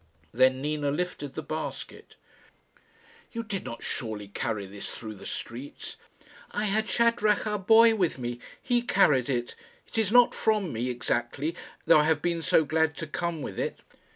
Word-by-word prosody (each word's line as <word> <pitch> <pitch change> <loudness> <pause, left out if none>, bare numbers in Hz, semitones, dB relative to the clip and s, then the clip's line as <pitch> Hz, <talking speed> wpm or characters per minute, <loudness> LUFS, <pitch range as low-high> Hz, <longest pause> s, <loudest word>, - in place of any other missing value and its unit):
Then 130 +1 +3
Nina 150 -1 -1
lifted 150 -2 -3
the 160 - -4
basket. 155 +2 -6 1.2
"You 230 -1 -3
did 200 -4 -4
not 115 -2 -7
surely 105 -3 -3
carry 100 0 -3
this 100 +1 -7
through 110 -2 -7
the 100 - -10
streets?" 125 +5 -6 0.5
"I - - -2
had 215 +2 0
Shadrach, 230 -3 +2
our 210 -1 -1
boy, 225 +4 +6
with 185 -10 0
me. 120 -1 -4 0.2
He 245 -1 +1
carried 150 - +3
it. 120 -2 -2 0.3
It - - -3
is 215 -3 +1
not 245 0 +6
from 210 - 0
me, 120 +3 -2
exactly; 125 +5 -2 0.3
though - - +7
I 150 - +3
have 155 -2 +1
been 170 -1 0
so 160 0 +3
glad 160 0 +1
to 165 - -4
come 165 0 -3
with 95 - -6
it." - - -2
155 Hz, 170 wpm, -28 LUFS, 125-210 Hz, 1.2 s, though